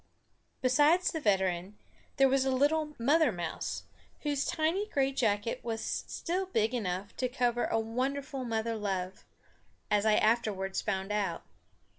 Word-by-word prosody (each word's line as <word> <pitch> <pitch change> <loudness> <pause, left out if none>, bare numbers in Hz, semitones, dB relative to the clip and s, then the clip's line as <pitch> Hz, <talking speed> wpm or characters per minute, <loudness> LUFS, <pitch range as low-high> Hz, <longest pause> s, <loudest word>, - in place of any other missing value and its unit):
Besides 295 +8 +4
the 320 - -3
veteran 190 -3 0 0.4
there 270 - +6
was 265 0 +3
a 265 - +1
little 300 +3 +1
mother 290 +3 +3
mouse, 175 -4 -4 0.4
whose 290 -2 0
tiny 340 +6 0
gray 275 -5 +1
jacket 225 -4 0
was 225 -1 -3
still 370 +2 -2
big 225 - +1
enough 200 -4 -3
to 255 - 0
cover 245 -1 +1
a - - 0
wonderful 265 +4 -2
mother 230 -1 -1
love, 190 -3 -3 0.7
as 205 -1 +3
I 215 -1 +4
afterwards 210 -4 +1
found 195 -1 -2
out. 200 -5 -1
235 Hz, 140 wpm, -31 LUFS, 205-275 Hz, 0.7 s, there